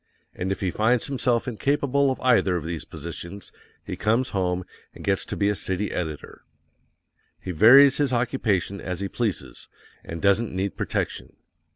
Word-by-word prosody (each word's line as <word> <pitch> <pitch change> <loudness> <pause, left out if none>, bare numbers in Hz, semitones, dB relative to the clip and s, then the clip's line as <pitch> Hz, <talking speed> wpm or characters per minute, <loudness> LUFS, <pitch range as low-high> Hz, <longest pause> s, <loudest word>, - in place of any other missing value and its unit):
AND 95 +2 -3
IF 95 - -3
HE 95 -2 0
FINDS 115 +5 +2
HIMSELF 125 -3 0
INCAPABLE 140 +3 +1
OF 130 - -2
EITHER 115 -7 +3
OF 85 - -2
THESE 85 -1 -4
POSITIONS, 85 +5 -7 0.3
he - - -5
comes 115 +5 +1
home, 90 -2 -1 0.3
and - - -11
gets 95 -1 0
to - - -5
be 100 - +2
a 105 - +2
city 95 0 -2
editor_. 80 -4 -5 1.0
He 90 - -5
varies 125 - +7
his 145 -3 +1
occupation 110 -6 0
as 90 0 -4
he 100 - -1
pleases, 105 -3 -4 0.4
and 85 - -7
doesn't 100 +2 +2
need 95 +1 -2
protection. - - -3
100 Hz, 165 wpm, -24 LUFS, 90-125 Hz, 1.0 s, varies